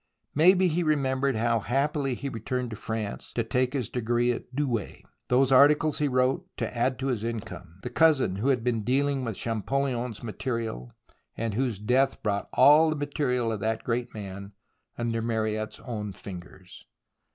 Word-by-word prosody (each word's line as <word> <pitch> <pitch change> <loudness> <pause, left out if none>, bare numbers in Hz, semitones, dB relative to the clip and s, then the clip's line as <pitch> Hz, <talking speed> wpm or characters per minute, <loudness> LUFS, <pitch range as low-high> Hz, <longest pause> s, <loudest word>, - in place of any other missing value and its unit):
Maybe 185 +5 +5
he 170 +1 0
remembered 135 -4 +1
how 115 +1 +1
happily 135 +3 0
he 140 - -5
returned 125 0 -3
to - - -4
France 110 -1 -5
to 115 - 0
take 125 +3 0
his 130 -5 -1
degree 120 0 0
at 120 +1 -6
Douai, 125 -8 -2 0.3
those 130 +1 +3
articles 145 +3 +5
he 150 - +2
wrote 130 +7 +1
to - - -3
add 125 +2 +1
to 130 - -4
his 115 -5 -1
income, 100 -7 -6
the 125 - -5
cousin 140 - +3
who 110 +7 -1
had 130 -4 +2
been 115 -3 0
deaUng 135 +3 +1
with 115 -4 -3
ChampolUon's 120 +1 -2
material, 115 - -4 0.5
and 115 -1 -2
whose 120 -1 -1
death 125 +6 +1
brought 100 -1 -1
all 155 +3 +7
the 155 - 0
material 140 -5 -1
of 110 - -3
that 110 +1 -1
great 120 0 -2
man 100 -1 -8 0.4
under 115 -1 -1
Mariette's 110 -1 -2
own 105 -5 -5
fingers. 90 -1 -11
120 Hz, 165 wpm, -27 LUFS, 110-135 Hz, 0.5 s, all